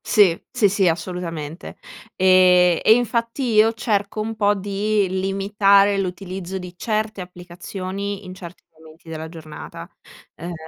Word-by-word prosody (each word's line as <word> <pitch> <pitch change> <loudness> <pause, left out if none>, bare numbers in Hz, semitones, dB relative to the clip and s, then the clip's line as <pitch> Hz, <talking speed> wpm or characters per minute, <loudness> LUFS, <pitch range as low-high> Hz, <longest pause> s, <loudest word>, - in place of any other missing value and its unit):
Sì, 195 -7 +4
sì, 205 - +2
sì 195 -1 +1
assolutamente. 165 -2 -4 0.4
Ehm, 180 -2 +5
e 220 - +7
infatti 235 +1 -1
io 215 +1 +5
cerco 215 -3 -2
un 220 +1 -3
po' 205 -1 +2
di 205 +1 0
limitare 195 +1 +2
l'utilizzo 185 0 -5
di 180 -1 -8
certe 215 0 -2
applicazioni 185 +3 -7
in 185 - -8
certi 180 -1 -11
momenti 160 +1 -17
della 160 0 -6
giornata, 160 -2 -10 0.5
ehm 175 +2 -7
190 Hz, 130 wpm, -21 LUFS, 180-205 Hz, 0.5 s, e